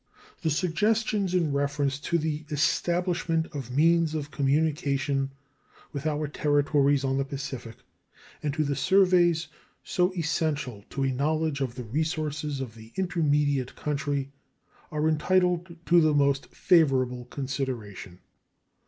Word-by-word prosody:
The 165 - 0
suggestions 195 +4 +1
in 165 -5 +1
reference 140 -1 0
to 170 +4 0
the 155 -1 -2
establishment 165 +2 +1
of 135 -5 -5
means 160 +4 +3
of 145 -1 -4
communication 140 -1 0 0.6
with 140 +1 -3
our 150 0 -1
territories 145 -1 +2
on 135 0 0
the - - +2
Pacific 135 -4 -6 0.7
and 150 - -1
to 155 - +1
the 140 -1 -1
surveys 180 -3 +3 0.4
so 180 +1 +1
essential 150 - -1
to 135 - -2
a 135 - +1
knowledge 150 +2 0
of 125 -3 -2
the 125 - -5
resources 150 +2 -2
of 125 -4 -6
the 110 0 -14
intermediate 150 -7 +1
country 140 -2 -2 0.6
are 150 0 0
entitled 175 +2 +1
to 175 0 +5
the 155 -2 +3
most 140 -1 +2
favorable 130 -8 +2
consideration. 125 -9 -5
150 Hz, 125 wpm, -27 LUFS, 135-165 Hz, 0.7 s, to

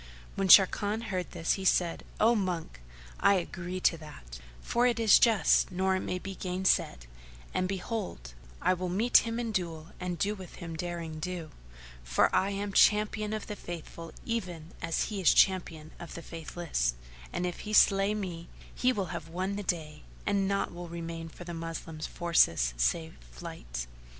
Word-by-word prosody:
When 195 -1 -1
Sharrkan 205 +3 +6
heard 185 -3 -2
this 165 - 0
he 195 - -4
said, 175 -2 +2 0.2
"O 230 +2 +5
monk, 180 - -2 0.4
I 200 - +5
agree 180 0 -3
to 165 - +3
that, 60 - -11 0.2
for 240 - +1
it 235 -2 0
is 225 -2 +7
just 225 -4 +4
nor 190 +1 +1
may 185 - -3
it 180 - -6
be 195 - -5
gainsaid; 180 - 0 0.5
and 185 - 0
behold, 190 - -4 0.3
I 185 - +4
will 180 0 -3
meet 215 +7 +4
him 230 0 0
in 235 -2 -2
duello 170 -4 -3
and 180 -1 -3
do 205 +5 0
with 190 -4 -10
him 170 -2 -7
derring 165 -2 -5
do, 170 -1 -5 0.5
for 60 +1 +2
I 195 - +3
am 200 0 -3
Champion 210 +1 +3
of 215 -1 -3
the 210 - -5
Faithful 170 -2 -8
even 180 -8 -4
as 165 -1 0
he 205 -3 -3
is 180 - +5
Champion 165 -5 +2
of 170 - -9
the 170 - -7
Faithless; 160 - -2 0.4
and 180 - -2
if 175 -1 -4
he 215 - -6
slay 200 0 +5
me, 175 -5 -5 0.2
he 255 - +2
will 195 -8 -2
have 170 -2 -5
won 185 +4 -3
the 205 - -3
day 160 -5 -3 0.2
and 200 -1 +1
naught 195 -2 -1
will 175 0 -7
remain 165 -1 -6
for 175 - -11
the 175 0 -7
Moslems 165 -1 -5
forces 85 - +2
save 160 - 0
flight. - - -7
180 Hz, 175 wpm, -30 LUFS, 165-200 Hz, 0.5 s, is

